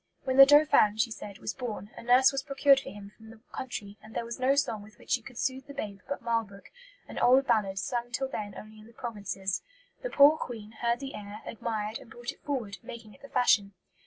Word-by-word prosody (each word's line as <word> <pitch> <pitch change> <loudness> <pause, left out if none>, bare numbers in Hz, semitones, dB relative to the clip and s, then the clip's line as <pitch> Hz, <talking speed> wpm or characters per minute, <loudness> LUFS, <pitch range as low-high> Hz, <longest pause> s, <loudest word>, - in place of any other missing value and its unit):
'When 260 -1 -1
the 275 0 +11
Dauphin,' 290 -8 +5
she 225 +1 +1
said, 205 -2 -8
'was - - -4
born, 220 -5 -6
a - - -9
nurse 250 +2 +5
was 275 -1 -2
procured 275 0 +4
for - - -8
him 200 0 -10
from 220 0 -15
the 225 0 -14
country, 210 -5 -6
and 215 +1 -14
there 235 - -2
was 235 +1 -6
no 260 +2 +3
song 280 -7 0
with 210 +1 -15
which - - -12
she 255 - +2
could 250 +1 -12
soothe 260 +1 -2
the 280 - -10
babe 205 -7 -5
but 280 - -4
'Marlbrook,' 225 -4 -3 0.4
an - - -6
old 260 +2 +5
ballad, 210 -6 +1
sung 240 +5 -2
till 265 +2 -2
then 210 -6 -5
only 215 0 -11
in 215 - -14
the 230 - -17
provinces. 200 -5 -4 0.4
The - - -3
poor 295 - +6
Queen 220 -3 -7
heard 235 +1 +1
the 270 -1 -6
air, 210 +1 -8
admired, 220 -1 -3
and - - -15
brought 240 +3 -6
it - - -20
forward, 240 -9 -4
making 230 -2 -10
it - - -20
the 280 - -12
fashion.' 205 -6 +3
230 Hz, 235 wpm, -29 LUFS, 210-265 Hz, 0.4 s, the